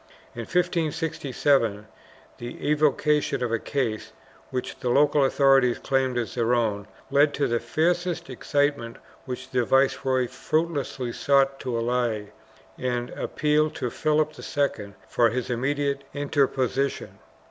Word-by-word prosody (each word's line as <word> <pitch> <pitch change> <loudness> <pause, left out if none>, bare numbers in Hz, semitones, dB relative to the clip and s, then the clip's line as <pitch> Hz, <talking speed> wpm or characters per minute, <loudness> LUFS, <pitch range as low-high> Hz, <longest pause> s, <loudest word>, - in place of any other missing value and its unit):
In 115 -1 -6
1567, 150 - 0 0.5
the 120 +4 -6
evocation 150 -2 +2
of 120 - -1
a 115 - +1
case, 115 -6 -3 0.4
which 130 -1 -4
the 125 - -2
local 145 +2 +4
authorities 135 -2 +4
claimed 130 -2 0
as 120 -2 -2
their 120 0 +1
own, 105 -4 -1 0.2
led 145 +1 +4
to 145 - +1
the 120 0 0
fiercest 175 +4 0
excitement 140 -2 -1 0.3
which 130 0 -7
the 125 -2 +2
viceroy 130 0 +2
fruitlessly 135 -2 -2
sought 135 -1 +2
to 125 -3 -3
allay 115 -3 -1 0.5
and 125 -1 -2
appealed 150 0 0
to 125 - -3
Philip 155 0 +1
II 110 -9 -2
for 120 -1 +3
his 125 +2 -3
immediate 140 +3 -1
interposition. 140 -1 -1
135 Hz, 125 wpm, -25 LUFS, 120-145 Hz, 0.5 s, local